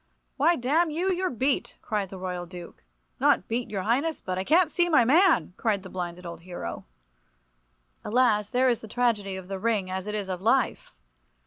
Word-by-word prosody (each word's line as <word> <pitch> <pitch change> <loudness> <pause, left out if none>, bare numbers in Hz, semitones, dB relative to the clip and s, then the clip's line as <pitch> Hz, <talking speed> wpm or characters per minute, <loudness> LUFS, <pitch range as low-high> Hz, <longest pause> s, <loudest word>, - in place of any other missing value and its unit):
"Why, 325 +5 +3
damn 310 +7 +1
you, 350 +5 0
you're 370 0 0
beat!" 260 +3 -1
cried 205 -3 -2
the 190 - -8
Royal 180 -1 -4
Duke. 175 -1 -11 0.4
"Not - - +3
beat, 235 +2 -2
your 195 -3 -3
highness, 275 - 0
but 185 0 -4
I - - -1
can't 325 - +3
see 350 0 +2
my 300 -8 +5
man!" 330 - +4
cried 205 -4 0
the 185 - -9
blinded 180 -1 -5
old 170 0 -7
hero. 170 - -7 1.2
Alas, 210 -3 +2
there 260 +1 +2
is 240 -3 +1
the 220 - -9
tragedy 215 -4 0
of 190 -1 -8
the 195 0 -5
ring 205 -3 0
as 190 +1 -4
it 210 - -3
is 205 -2 -3
of 185 -1 -4
life! 245 +5 +1
215 Hz, 195 wpm, -26 LUFS, 185-270 Hz, 1.2 s, my